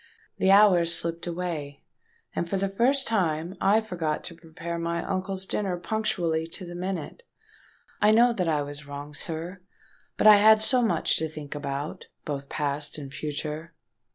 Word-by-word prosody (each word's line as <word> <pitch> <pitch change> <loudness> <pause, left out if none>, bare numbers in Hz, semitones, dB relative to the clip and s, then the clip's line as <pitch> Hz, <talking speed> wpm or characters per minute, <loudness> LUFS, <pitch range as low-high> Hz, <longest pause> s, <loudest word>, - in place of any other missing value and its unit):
The 190 - +3
hours 195 -4 +6
slipped 170 0 -1
away; 165 -5 -4 0.5
and 170 - -2
for 195 - 0
the 195 +1 0
first 255 +7 +2
time 175 -5 0 0.2
I 215 +2 +5
forgot 170 -8 -3
to 170 - -7
prepare 165 +1 -6
my 170 0 -2
uncle's 190 0 -3
dinner 190 -2 -2
punctually 175 -5 -1
to 180 +3 -5
the 175 - -8
minute. 185 - -5 0.8
I 210 - +5
know 235 +2 +5
that 180 -6 -1
I 150 -2 +1
was 145 +1 -8
wrong, 145 +1 -7
sir—but 175 +8 -6
I 210 -1 +10
had 215 +1 +7
so 250 +2 +4
much 180 -9 +2
to 160 - -1
think 150 -2 -7
about, 140 0 -5 0.2
both 140 -2 -4
past 145 0 -2
and 140 -2 -8
future! 155 +2 -5
170 Hz, 160 wpm, -26 LUFS, 155-195 Hz, 0.8 s, I